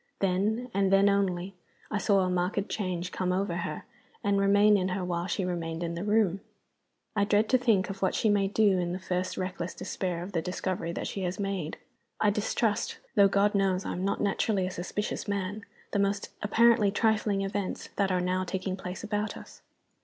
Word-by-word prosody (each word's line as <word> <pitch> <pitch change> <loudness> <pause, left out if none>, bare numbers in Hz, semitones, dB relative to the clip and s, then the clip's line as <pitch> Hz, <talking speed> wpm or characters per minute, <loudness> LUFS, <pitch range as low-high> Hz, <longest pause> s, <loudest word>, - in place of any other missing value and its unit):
Then 210 +6 0
(and 195 -1 +2
then 195 +1 +5
only) 195 -2 0 0.4
I 210 - 0
saw 200 -2 +3
a 185 - +1
marked 180 +3 0
change 180 -3 -2
come 185 -1 -1
over 185 -1 0
her, 155 -3 -4 0.4
and 200 -1 +2
remain 205 +1 +5
in 185 -2 +1
her 185 0 -2
while 175 0 -2
she 190 +1 -1
remained 170 -2 -3
in 170 0 -2
the 170 +2 -4
room. 205 -3 +2 0.7
I 205 - +3
dread 210 +1 +3
to 260 - +5
think 220 -6 +3
of 195 - -9
what 190 - +1
she - - +1
may 205 -2 +3
do 200 -2 +3
in 175 0 -1
the 185 - -3
first 185 0 -2
reckless 185 -1 -4
despair 180 -2 -3
of 185 - -7
the 170 -4 0
discovery 180 -1 -3
that - - -4
she 195 - -4
has 180 +1 -2
made. 195 -6 -3 0.4
I 210 - +4
distrust 210 +1 0 0.2
though 200 -1 +6
God 200 +1 +2
knows 195 -2 +1
I - - -2
am 180 - -3
not 200 - 0
naturally 200 -1 +1
a 185 - -3
suspicious 185 +5 -3
man 205 +2 -3 0.3
the 205 - 0
most 200 0 0
apparently 225 0 +4
trifling 210 -1 +1
events 195 -1 -3
that 195 -1 +2
are 180 -1 +1
now 185 +1 0
taking 185 +1 -3
place 185 +1 -7
about 210 -1 -2
us. - - -13
195 Hz, 200 wpm, -29 LUFS, 180-205 Hz, 0.7 s, though